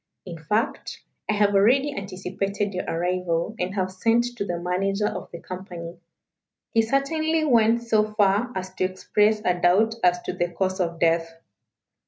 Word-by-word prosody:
In 170 -3 -8
fact, 210 - -2 0.3
I - - +3
have 205 -1 +2
already 265 +8 +3
anticipated 195 +1 -3
your 185 - -3
arrival, 175 +2 -1
and 185 +2 -2
have 185 -1 -1
sent 230 +5 +1
to - - -1
the 175 -3 -3
manager 195 +4 -1
of - - -4
the 170 - -8
company. 175 -2 -8 0.7
He 225 - +4
certainly 310 +6 0
went 235 -3 +3
so 215 -2 +1
far 205 +3 +2
as 185 0 -5
to 185 - -2
express 210 +3 +1
a 180 -1 +1
doubt 205 +6 +4
as 180 0 +4
to - - -4
the 175 -1 -1
cause 185 +2 -2
of 170 -2 -1
death. 165 0 +2
195 Hz, 165 wpm, -24 LUFS, 180-220 Hz, 0.7 s, He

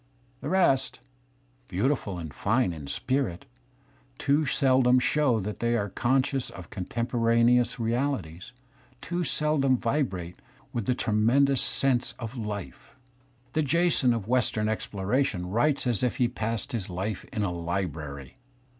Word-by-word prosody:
The 145 - -5
rest, 135 -8 +2 0.7
beauti 95 +3 -2
(^:ti3^f^€ 145 - +2
fill 95 -3 -6
and 80 -4 -7
fine 100 - +1
in 75 -4 -8
spirit, 130 - -2 0.7
too 145 +2 +1
seldom 130 -1 +4
show 130 -2 +2
that 105 +1 -5
they 120 0 +1
are 100 -2 -2
conscious 130 +5 0
^colf - - -13
r; - - -10
of 85 - -14
contemporaneous 115 +3 +2
reaUties, 115 - -2 0.5
too 175 +1 -3
seldom 150 -5 +2
vibrate 115 - -2 0.4
with 120 -5 -3
a^W^ 125 -1 +1
tremendous 125 +6 +3
sense 130 -2 +1
of 115 +1 -6
life. 105 -5 -6 0.6
The 155 - +2
Jason 155 -3 +3
of 115 -4 -2
western 115 -3 +1
exploration 105 -1 -1
writes 135 +7 +2
as 120 -4 +1
if 125 -2 0
he - - +2
had 120 0 0
passed 115 -3 -2
his 110 -6 -3
life 95 +3 -3
in 105 - -3
a 95 - 0
library. 80 - -4
120 Hz, 145 wpm, -27 LUFS, 100-135 Hz, 0.7 s, seldom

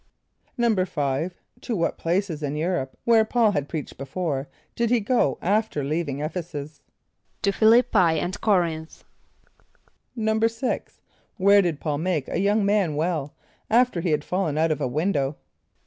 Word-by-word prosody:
= - - -27
=5.= 180 - 0 0.3
To 235 - -3
what 170 -3 -1
places 170 -2 -1
in 145 0 -2
Europe 155 -4 -2
where 230 -2 +5
P[a:]ul 220 -1 +2
had 145 -7 -2
preached 155 -6 -6
before, 140 0 -3 0.3
did 235 -1 0
he 245 0 +3
go 215 - +1
after 205 -5 0
leaving 150 -1 -2
[)E]ph´e 170 +4 -3
s[)u]s? 150 -2 -8 0.6
=To 200 - +3
Ph[)i] 220 +2 +2
l[)i]p´p[=i] 220 -7 +5
and 175 +3 -2
C[)o]r´inth.= 170 -7 -1 1.1
=6.= 225 +2 -1 0.4
Where 200 +2 +6
did 170 -6 -1
P[a:]ul 150 -3 -2
make 165 -5 -1
a - - -1
young 205 +2 +2
man 200 -6 +2
well, 155 -2 -2 0.3
after 240 -5 +3
he 175 - -1
had 150 -1 +1
fallen 180 -5 -1
out 160 +1 +2
of 155 - -2
a - - +1
window? 145 0 -1
175 Hz, 155 wpm, -24 LUFS, 150-210 Hz, 1.1 s, Where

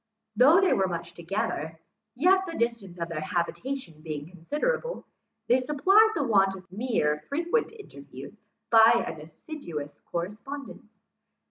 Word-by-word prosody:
Though 280 - +7
they 385 -1 +3
were 190 - +2
much 170 -1 -5
together, 170 -3 -3 0.4
yet, 375 +7 +3
the 330 - -6
distance 230 -6 -2
of 170 -1 -3
their 165 -2 -3
habitation 175 - -3
being 155 -2 -6
considerable, 300 - -3 0.4
they 250 +2 +4
supplied 370 - +4
the 295 - +1
want 195 -5 +3
of 185 -1 -12
mere 190 -9 0
frequent 340 +12 0
interviews 445 -2 -12 0.3
by 230 +1 +7
an 160 -1 -6
assiduous 155 - -8
correspondence. 215 +4 -7
225 Hz, 130 wpm, -27 LUFS, -, 0.4 s, Though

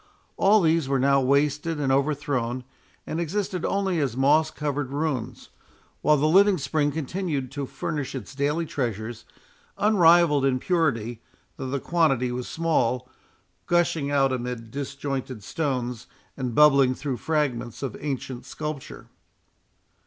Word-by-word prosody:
All 210 +2 +4
these 160 -4 +2
were 135 - +2
now 140 +1 +3
wasted 150 +4 +1
and 135 -2 +1
overthrown, 135 -3 0 0.4
and 160 - -3
existed 180 +1 -2
only 195 -3 0
as 130 -5 -1
moss 150 +4 +4
covered 145 -3 -3
ruins, 135 -4 -3 0.5
while 150 0 +4
the 150 +2 +2
living 195 +4 +5
spring 145 +1 0
continued 155 -3 -3
to 140 -1 -4
furnish 140 +1 -4
its 125 -2 -7
daily 145 +4 0
treasures, 115 -5 -4 0.5
unrivalled 170 -8 +5
in 135 -2 +2
purity, 125 - 0 0.4
though 130 - -5
the 140 +1 -1
quantity 135 -7 +1
was 125 0 -4
small, 130 -7 0 0.6
gushing 165 -4 +1
out 135 -2 +2
amid 120 -2 -5
disjointed 135 -4 -4
stones, 125 -3 -3 0.3
and 125 -4 -4
bubbling 140 -4 +5
through 135 -2 -3
fragments 135 -7 -2
of 130 -5 -3
ancient 135 -3 -4
sculpture. 150 -3 -6
140 Hz, 130 wpm, -25 LUFS, 130-155 Hz, 0.6 s, living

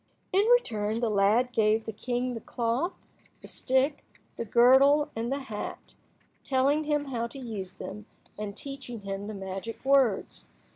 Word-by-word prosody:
In 400 +3 +4
return, 225 - +2
the 235 -2 0
lad 210 +5 +3
gave 220 -1 +2
the 220 - -5
king 245 +3 -2
the 230 - -6
cloth, 240 - -1 0.5
the - - -9
stick, 265 +3 0 0.3
the 230 - -4
girdle, 265 +6 +5
and 230 +2 -2
the 275 - 0
hat, 220 -6 -7 0.5
telling 280 +3 +2
him 295 -1 0
how 235 -4 -2
to 255 - -12
use 210 -8 -6
them, 210 +3 -8 0.3
and 210 -1 -6
teaching 270 -5 -7
him 195 0 -5
the 215 - -5
magic 195 +5 -6
words. 265 -7 +2
235 Hz, 155 wpm, -28 LUFS, 210-270 Hz, 0.5 s, girdle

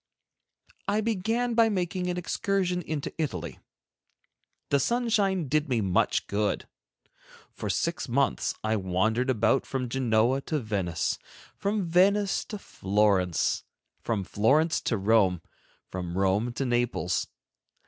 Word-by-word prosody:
II. 205 - +2
I 215 - +2
began 225 +3 0
by 225 -1 +5
making 180 -2 -1
an 175 - -2
excursion 180 0 0
into 155 -3 -4
Italy. 85 - -4 1.1
The 140 - +3
sunshine 205 - +1
did 150 +2 0
me 120 -3 +1
much 95 -4 +1
good. 105 0 -1 0.9
For - - -5
six - - -1
months - - +1
I 110 0 +1
wandered 110 +7 0
about 130 +2 +2
from 125 -2 -3
Genoa 120 +1 +2
to 155 - 0
Venice, 100 - -1 0.4
from 200 +1 -1
Venice 195 +4 +3
to 210 - -6
Florence, 100 - +1 0.4
from 105 -4 -1
Florence 140 - +2
to 115 - +1
Rome, 95 -4 +3 0.4
from 90 -1 -5
Rome 100 +5 +1
to 135 - -2
Naples. 120 -7 0
130 Hz, 125 wpm, -27 LUFS, -, 1.1 s, by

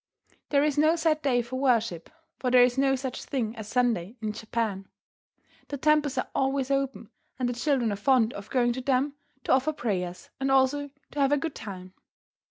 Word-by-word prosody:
There 285 -1 +3
is 295 -1 +1
no 310 +2 +4
set 320 -2 +1
day 245 -4 +2
for 250 +2 -5
worship, 230 -10 +1 0.3
for 255 - 0
there 250 0 +7
is 245 0 +2
no 270 0 +3
such 260 -1 -5
thing 235 -5 -2
as 220 -3 -7
Sunday 235 -4 0
in 215 -1 -2
Japan. 220 -3 -3 0.8
The 285 - -4
temples 300 -1 +2
are 255 - -1
always 270 0 0
open, 270 -5 -2 0.3
and 255 -1 0
the 245 - -1
children 245 -2 +1
are - - -1
fond 235 +2 +3
of 200 0 -9
going 240 -2 +2
to 255 - -5
them 270 +2 +1 0.3
to - - -1
offer 265 +4 +3
prayers, 180 -9 -3
and 270 0 0
also 270 +2 +2 0.2
to 290 - -5
have 275 0 +3
a 290 - +4
good 320 +1 -3
time. 185 -4 -8
255 Hz, 195 wpm, -27 LUFS, 225-275 Hz, 0.8 s, there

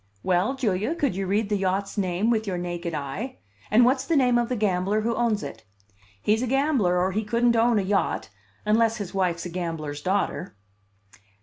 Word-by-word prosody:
Well, 185 +8 +1
Julia, 220 - 0
could 280 - 0
you 195 0 -2
read 205 +2 0
the 205 - +1
yacht's 195 +1 -1
name 195 +2 0
with 220 -2 0
your 185 -2 -1
naked 175 -1 -4
eye? 150 - -5 0.3
And 235 +3 +6
what's 260 +1 +2
the 320 +4 0
name 250 -4 +4
of 235 - -1
the 250 - 0
gambler 205 -1 +1
who 230 +2 0
owns 230 -3 0
it? 110 0 -8 0.6
He's 215 - +1
a 255 - -1
gambler, 265 -9 +2
or 185 +2 +1
he 215 +3 -1
couldn't 235 +2 +2
own 230 0 +3
a 200 - +1
yacht 195 +1 0 0.4
unless 225 +1 +3
his 205 -4 -6
wife's 180 -3 0
a - - -4
gambler's 165 -4 -4
daughter." 185 - -1
205 Hz, 195 wpm, -25 LUFS, 180-235 Hz, 0.6 s, And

